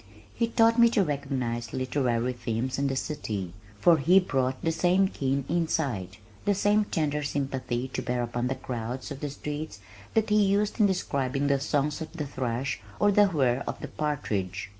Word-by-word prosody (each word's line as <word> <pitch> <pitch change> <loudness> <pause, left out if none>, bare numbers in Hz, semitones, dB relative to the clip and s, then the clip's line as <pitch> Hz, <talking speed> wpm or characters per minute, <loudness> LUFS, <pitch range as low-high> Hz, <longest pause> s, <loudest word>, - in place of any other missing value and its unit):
He 230 - 0
taught 230 0 +4
me 235 0 +8
to 200 - +6
recognize 125 -6 -2
literary 125 -2 0
themes 120 +2 -2
in 140 - +1
the 135 - -1
city, 105 - -3 0.3
for 170 +8 +6
he 175 +7 +6
brought 130 -7 -1
the 165 - +2
same 180 +4 +3
keen 135 -5 -1
insight, 140 - -1 0.3
the 205 - +2
same 205 +2 +3
tender 150 -5 -1
sympathy 135 -3 -2
to - - -3
bear 125 0 -1
upon 120 +1 -2
the 130 - -1
crowds 125 +3 -5
of 140 - -6
the 145 - -3
streets 150 -2 -5 0.4
that 220 -1 +2
he 210 0 +5
used 200 +2 +1
in 210 - +6
describing 140 -7 -1
the 140 -1 +2
songs 145 +2 0
of 160 - -6
the 160 -3 -3
thrush 130 -1 -3 0.2
or 205 0 +4
the 205 0 +5
whir 135 -7 +1
of - - -4
the - - -6
partridge. 100 -11 -2
140 Hz, 180 wpm, -27 LUFS, 125-170 Hz, 0.4 s, me